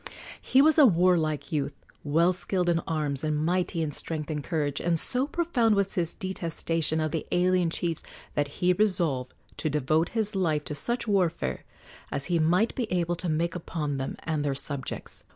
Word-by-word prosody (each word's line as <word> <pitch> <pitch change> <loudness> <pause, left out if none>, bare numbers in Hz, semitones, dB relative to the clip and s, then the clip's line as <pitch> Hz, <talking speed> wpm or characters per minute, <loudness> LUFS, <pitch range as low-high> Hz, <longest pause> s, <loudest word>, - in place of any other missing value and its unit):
He 265 +2 +4
was 315 +1 +5
a 295 - +9
warlike 170 -5 +2
youth, 145 -3 -1 0.3
well 165 +5 +3
skilled 180 0 -1
in 170 -1 +3
arms 150 -3 -1
and 155 -1 0
mighty 175 -1 0
in 150 - -2
strength 155 +1 -4
and 150 -2 -3
courage, 145 -4 -1
and 170 -1 +1
so 255 - +2
profound 285 -10 +2
was 200 -1 +1
his 170 -2 -1
detestation 165 -3 -2
of 155 -1 0
the 160 - -3
alien 180 -1 +3
chiefs 165 -1 -1 0.3
that 145 -1 +1
he 180 +5 +1
resolved 170 -11 0 0.2
to 155 - -1
devote 150 +3 +1
his 215 -2 0
life 160 -6 +1
to 150 - -5
such 235 - -2
warfare 170 - 0 0.5
as 140 - -2
he 170 - +3
might 180 +8 +3
be 240 -4 -3
able 175 -1 +1
to 175 - -2
make 165 +2 0
upon 155 -4 -3
them 135 0 -4
and 155 -3 -1
their 140 -2 0
subjects. 140 -1 -5
165 Hz, 185 wpm, -27 LUFS, 150-185 Hz, 0.5 s, a